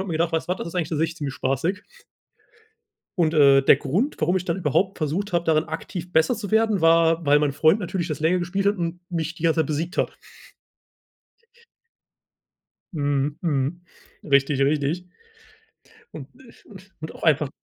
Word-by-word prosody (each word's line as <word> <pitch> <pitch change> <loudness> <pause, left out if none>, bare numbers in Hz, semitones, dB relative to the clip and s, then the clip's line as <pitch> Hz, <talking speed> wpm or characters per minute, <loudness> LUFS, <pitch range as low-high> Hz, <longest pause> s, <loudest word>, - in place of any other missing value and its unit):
habe 190 - -5
mir 165 - -3
gedacht, 165 +1 0
weißt 165 +1 -2
was, 180 - 0
das - - -5
ist 170 - -11
eigentlich 165 -3 -1
an 150 - -1
sich 160 +1 -1
ziemlich 140 -4 -5
spaßig. 160 +10 -2 1.4
Und, 160 -2 +2
äh, 140 -3 +6
der 135 - +6
Grund, 175 - -1
warum 175 +4 +1
ich 180 - -6
dann 170 - -1
überhaupt 190 +3 0
versucht 175 +6 -3
habe, 170 0 +1
darin 160 -1 +2
aktiv 180 -1 -7
besser 160 +9 +3
zu 210 -1 -7
werden, 220 -3 +2
war, 165 0 +3
weil 145 +1 +5
mein 145 -1 +1
Freund 155 +7 +3
natürlich 180 -1 -3
das 150 -1 -5
länger 180 +3 +2
gespielt 185 +3 -2
hat 200 0 +2
und 170 +1 -4
mich 165 -1 -3
die 165 - -11
ganze 165 0 +2
Zeit 155 - +1
besiegt 160 +3 -3
hat. - - -1 2.8
Mhm, 145 -1 -1
mhm. 155 +1 -1 0.4
Richtig, 140 -1 +2
richtig. 150 +5 0 1.0
Und, 140 -3 -9
äh 255 -3 -16
u 210 - -16 0.3
und 155 - -7
auch - - -12
einfach 150 -3 +2
165 Hz, 180 wpm, -23 LUFS, 150-180 Hz, 2.8 s, äh